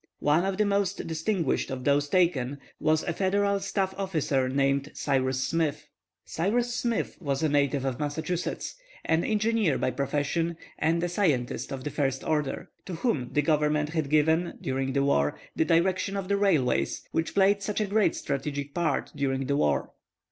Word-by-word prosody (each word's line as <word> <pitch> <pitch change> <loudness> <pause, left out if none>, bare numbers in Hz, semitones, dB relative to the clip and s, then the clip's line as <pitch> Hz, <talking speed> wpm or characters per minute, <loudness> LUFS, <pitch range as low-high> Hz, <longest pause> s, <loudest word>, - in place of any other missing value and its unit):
One 155 +5 +2
of 195 -1 -1
the 210 - +3
most 200 -1 0
distinguished 165 0 -1
of 130 -1 -4
those 145 +1 +2
taken 145 -7 +2 0.2
was 155 0 +2
a 175 - -2
Federal 200 +2 +1
staff 195 -1 -1
officer 150 -9 0
named 140 +1 +1
Cyrus 130 -2 0
Smith. 160 +2 -1 0.4
Cyrus 235 +8 0
Smith 235 -2 -1
was 140 -2 -1
a 155 - +3
native 140 -1 +1
of 130 -2 -2
Massachusetts, 155 +4 -3 0.3
an 165 +1 +2
engineer 215 -6 +1
by 130 - 0
profession, 145 +5 -1 0.2
and 165 +2 +1
a - - +1
scientist 155 -10 0
of 135 -1 -5
the 150 - -3
first 135 -2 -1
order, 150 -3 -2 0.2
to 185 - -4
whom 155 - -1
the 150 - +2
Government 150 0 +2
had 155 -3 -2
given, 160 +3 +2
during 135 0 -2
the 140 0 +2
war, 75 - +1 0.2
the 160 - +2
direction 185 +4 +1
of 195 -1 -4
the 200 - +3
railways, 145 - +1
which 160 - -1
played 200 +1 +4
such 210 +1 -2
a 215 - +1
great 205 +1 +2
strategic 140 0 -3
part 170 -5 0
during 135 -1 -1
the 140 - 0
war. 70 - +1
155 Hz, 170 wpm, -27 LUFS, 140-190 Hz, 0.4 s, played